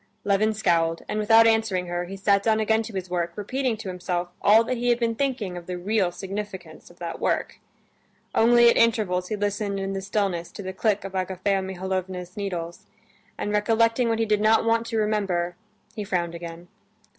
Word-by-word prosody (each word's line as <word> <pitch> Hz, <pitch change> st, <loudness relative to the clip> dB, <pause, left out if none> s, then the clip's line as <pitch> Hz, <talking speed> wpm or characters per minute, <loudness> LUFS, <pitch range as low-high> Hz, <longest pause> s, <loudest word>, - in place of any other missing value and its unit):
Levin 205 Hz, +2 st, +2 dB
scowled, 170 Hz, -6 st, +1 dB
and 215 Hz, -, -2 dB
without 225 Hz, +1 st, +6 dB
answering 220 Hz, -5 st, +2 dB
her, 175 Hz, 0 st, -3 dB
he 195 Hz, +2 st, -8 dB
sat 200 Hz, 0 st, +3 dB
down 220 Hz, +1 st, +2 dB
again 220 Hz, +1 st, +2 dB
to 220 Hz, -2 st, -8 dB
his 185 Hz, -1 st, -3 dB
work, 175 Hz, -1 st, -2 dB
repeating 250 Hz, +3 st, -2 dB
to 220 Hz, -2 st, -8 dB
himself 180 Hz, -1 st, -3 dB
all 220 Hz, +3 st, +6 dB
that 255 Hz, +2 st, -2 dB
he 245 Hz, +1 st, 0 dB
had 240 Hz, -, +4 dB
been 230 Hz, -1 st, +1 dB
thinking 240 Hz, -8 st, -2 dB
of 175 Hz, -1 st, -8 dB
the 180 Hz, -1 st, -4 dB
real 195 Hz, 0 st, 0 dB
significance 190 Hz, -3 st, -7 dB
of 175 Hz, -, -18 dB
that 170 Hz, -2 st, -6 dB
work. -, -, -1 dB, 0.7 s
Only 235 Hz, +1 st, +6 dB
at 235 Hz, -, +5 dB
intervals 210 Hz, -6 st, +2 dB
he 215 Hz, -, -2 dB
listened 205 Hz, -1 st, -2 dB
in 195 Hz, 0 st, -3 dB
the 195 Hz, -, -3 dB
stillness 195 Hz, -4 st, -2 dB
to 205 Hz, -, -7 dB
the 190 Hz, 0 st, -5 dB
click 210 Hz, +1 st, 0 dB
of 195 Hz, -, -5 dB
Agafea 190 Hz, +1 st, -1 dB
Mihalovna's 185 Hz, -1 st, -4 dB
needles, 175 Hz, -5 st, -5 dB, 0.5 s
and 205 Hz, -, -3 dB
recollecting 230 Hz, +3 st, +2 dB
what 225 Hz, -, +1 dB
he 225 Hz, -, +1 dB
did 210 Hz, -1 st, +1 dB
not 220 Hz, +1 st, +4 dB
want 230 Hz, 0 st, +1 dB
to 230 Hz, -, -2 dB
remember, 195 Hz, -5 st, 0 dB, 0.4 s
he 210 Hz, -, -3 dB
frowned 175 Hz, -3 st, -1 dB
again. 170 Hz, 0 st, -8 dB
200 Hz, 195 wpm, -25 LUFS, 180-220 Hz, 0.7 s, without